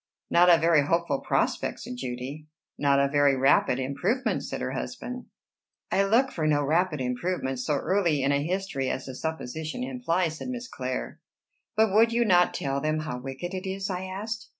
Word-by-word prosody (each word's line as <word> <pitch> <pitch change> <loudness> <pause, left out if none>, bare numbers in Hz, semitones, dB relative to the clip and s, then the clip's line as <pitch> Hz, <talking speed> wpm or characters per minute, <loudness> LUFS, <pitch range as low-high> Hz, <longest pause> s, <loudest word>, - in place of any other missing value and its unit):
"Not 175 +1 +6
a 170 - +8
very 165 -3 +3
hopeful 170 -4 +1
prospect," - - -1
said 125 - -6
Judy. 130 +4 -6 0.3
"Not 140 -1 +2
a 140 - +3
very 145 -1 +3
rapid 130 -1 +3
improvement," 140 - -1
said - - -5
her - - -3
husband. 250 0 -5 0.7
"I 195 - +3
look 245 +6 +3
for 155 -2 -1
no 145 -1 +2
rapid 160 +2 +1
improvement, 130 +1 -2
so 145 +3 0
early 170 -3 +1
in 140 - +2
a 140 0 +2
history 175 -6 -2
as 130 - -3
the 130 - -7
supposition 160 - -4
implies," 185 -11 -1
said - - -6
Miss 250 -1 -5
Clare. 130 - -4 0.6
"But 220 -2 +3
would 225 +2 +5
you 235 0 +2
not 180 -4 +4
tell 140 0 -2
them 155 +1 0
how 140 -5 -4
wicked 135 +8 -6
it 190 0 -4
is?" 195 +1 -3
I 185 0 -3
asked. 215 +4 -5
160 Hz, 185 wpm, -27 LUFS, 140-190 Hz, 0.7 s, a